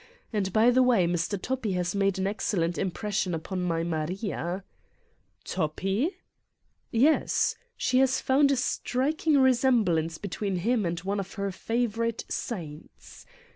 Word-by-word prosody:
And, 195 Hz, -3 st, 0 dB
by 220 Hz, +5 st, +5 dB
the 255 Hz, +1 st, +4 dB
way, 240 Hz, -8 st, +4 dB
Mr. 175 Hz, +3 st, -1 dB
Toppi 245 Hz, -3 st, -2 dB
has 180 Hz, -1 st, -1 dB
made 195 Hz, -1 st, +1 dB
an 190 Hz, -, -1 dB
excellent 185 Hz, -4 st, -1 dB
im 190 Hz, -, 0 dB
pression 195 Hz, -1 st, -2 dB
upon 180 Hz, +3 st, -4 dB
my 165 Hz, -2 st, 0 dB
Maria" 175 Hz, +3 st, -3 dB, 0.4 s
' -, -, -41 dB
"Toppi?" 195 Hz, -, -1 dB, 0.8 s
"Yes. 275 Hz, +7 st, +3 dB, 0.2 s
She 255 Hz, 0 st, +2 dB
has 260 Hz, -1 st, +3 dB
found 280 Hz, +2 st, +3 dB
a -, -, +3 dB
striking 280 Hz, +4 st, 0 dB
resemblance 230 Hz, -, +3 dB
between 200 Hz, 0 st, -3 dB
him 210 Hz, +2 st, +1 dB
and 170 Hz, 0 st, -2 dB
one 200 Hz, +2 st, -2 dB
of 195 Hz, 0 st, -6 dB
her 200 Hz, -1 st, -2 dB
favorite 230 Hz, +2 st, -1 dB
saints. 160 Hz, -9 st, -7 dB
200 Hz, 140 wpm, -27 LUFS, 175-245 Hz, 0.8 s, by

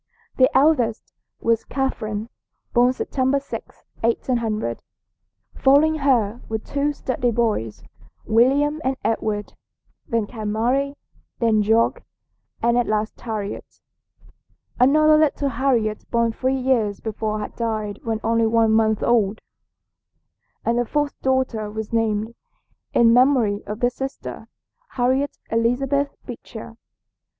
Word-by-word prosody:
The 260 Hz, -1 st, +5 dB
eldest 260 Hz, -6 st, +2 dB, 0.3 s
was 230 Hz, -1 st, +1 dB
Catherine, 225 Hz, -5 st, -3 dB, 0.4 s
born 245 Hz, +1 st, +5 dB
September 265 Hz, +1 st, 0 dB
6, 280 Hz, -, -9 dB, 0.2 s
1800. 225 Hz, -, -1 dB, 0.7 s
Following 295 Hz, +4 st, +4 dB
her 240 Hz, -5 st, +1 dB
were 220 Hz, -, -1 dB
two 280 Hz, +6 st, -1 dB
sturdy 255 Hz, -3 st, -1 dB
boys, 215 Hz, -, -1 dB, 0.4 s
William 275 Hz, +7 st, +3 dB
and 265 Hz, 0 st, 0 dB
Edward; 215 Hz, -2 st, -1 dB, 0.5 s
then 230 Hz, -2 st, 0 dB
came 215 Hz, -2 st, -5 dB
Mary, 270 Hz, +6 st, 0 dB, 0.4 s
then 225 Hz, -2 st, +2 dB
George, 220 Hz, +2 st, +3 dB, 0.7 s
and 235 Hz, +1 st, +3 dB
at 240 Hz, -, 0 dB
last 215 Hz, 0 st, -2 dB
Harriet. 215 Hz, -3 st, -5 dB, 1.0 s
Another 305 Hz, +4 st, +5 dB
little 290 Hz, -2 st, +1 dB
Harriet 235 Hz, -4 st, 0 dB
born 235 Hz, -1 st, +2 dB
three 260 Hz, +3 st, -1 dB
years 240 Hz, -6 st, +1 dB
before 215 Hz, -1 st, -3 dB
had 210 Hz, -, -6 dB
died 215 Hz, -3 st, -3 dB
when 225 Hz, -1 st, -2 dB
only 230 Hz, 0 st, +2 dB
one 225 Hz, 0 st, +3 dB
month 220 Hz, -1 st, +2 dB
old, 220 Hz, -3 st, +2 dB, 1.3 s
and 235 Hz, +1 st, +2 dB
the 245 Hz, -, +1 dB
fourth 295 Hz, +2 st, 0 dB
daughter 260 Hz, -5 st, 0 dB
was 220 Hz, +1 st, -6 dB
named, 220 Hz, 0 st, 0 dB, 0.6 s
in 230 Hz, -1 st, +5 dB
memory 245 Hz, -5 st, +3 dB
of 210 Hz, +2 st, -5 dB
this 245 Hz, 0 st, +1 dB
sister, 270 Hz, 0 st, -6 dB, 0.5 s
Harriet 260 Hz, +3 st, 0 dB
Elizabeth 265 Hz, +5 st, +1 dB, 0.2 s
Beecher. 230 Hz, -1 st, -9 dB
235 Hz, 120 wpm, -22 LUFS, 220-265 Hz, 1.3 s, The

